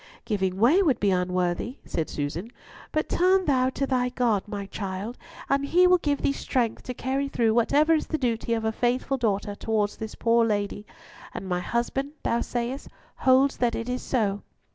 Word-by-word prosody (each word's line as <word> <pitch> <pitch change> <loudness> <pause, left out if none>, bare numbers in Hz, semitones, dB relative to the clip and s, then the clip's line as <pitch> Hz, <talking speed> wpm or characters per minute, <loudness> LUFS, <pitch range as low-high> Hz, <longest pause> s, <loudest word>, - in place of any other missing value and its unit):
"Giving 190 -4 -1
way 260 - +5
would 295 -10 +2
be 200 -1 +2
unworthy," 180 +6 -1
said 160 - -2
Susan, 155 +9 -4 0.4
"but 310 - 0
turn 370 +1 +3
thou 260 -3 +3
to 275 +1 -2
thy 250 -2 +1
God, 240 -5 +1
my 205 -1 -5
child, 195 +3 -5 0.3
and 275 0 +1
He 350 +6 +4
will 360 0 +5
give 290 -3 -1
thee - - +3
strength 245 -4 -1
to 250 - -5
carry 270 +3 -1
through 230 -5 +1
whatever 290 +7 +3
is 315 - 0
the 315 - -1
duty 235 -3 0
of 225 -1 -3
a 220 - +1
faithful 250 +4 0
daughter 205 -4 -1
towards 210 0 -1
this 220 -1 -6
poor 230 0 +3
lady; 205 -1 -1 0.5
and 190 - -5
my 180 -1 0
husband, 240 +8 -2
thou 235 - +1
sayest, 245 +3 -3 0.3
holds 265 +1 +4
that 240 -2 +1
so - - -2
it 230 +2 -5
is?" 250 +1 -3
235 Hz, 185 wpm, -26 LUFS, 205-270 Hz, 0.5 s, way